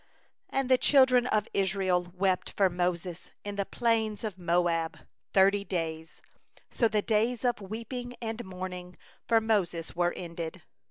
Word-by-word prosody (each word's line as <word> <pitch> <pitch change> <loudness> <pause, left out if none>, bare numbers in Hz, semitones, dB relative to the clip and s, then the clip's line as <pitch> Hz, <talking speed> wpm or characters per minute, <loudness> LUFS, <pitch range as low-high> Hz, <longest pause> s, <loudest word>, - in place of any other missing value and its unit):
8And 270 -1 0
the 255 -1 +4
children 260 -3 +5
of 215 -3 +1
Israel 190 -2 +1
wept 185 -1 +1
for 195 -2 +4
Moses 175 0 -2
in 205 0 -5
the 200 -1 -1
plains 225 -3 0
of 215 -3 -3
Moab 170 -2 0 0.3
thirty 200 +1 +4
days; 160 -4 -4 0.5
so 230 - +3
the 210 -1 0
days 230 +3 +1
of 240 -3 +1
weeping 235 +5 -6
in 225 -2 -5
the 240 - -6
mourning 180 -2 -7 0.3
for 230 -1 +5
Moses 185 -7 -1
were 175 0 +2
ended. 170 0 -6
195 Hz, 150 wpm, -29 LUFS, 180-225 Hz, 0.5 s, children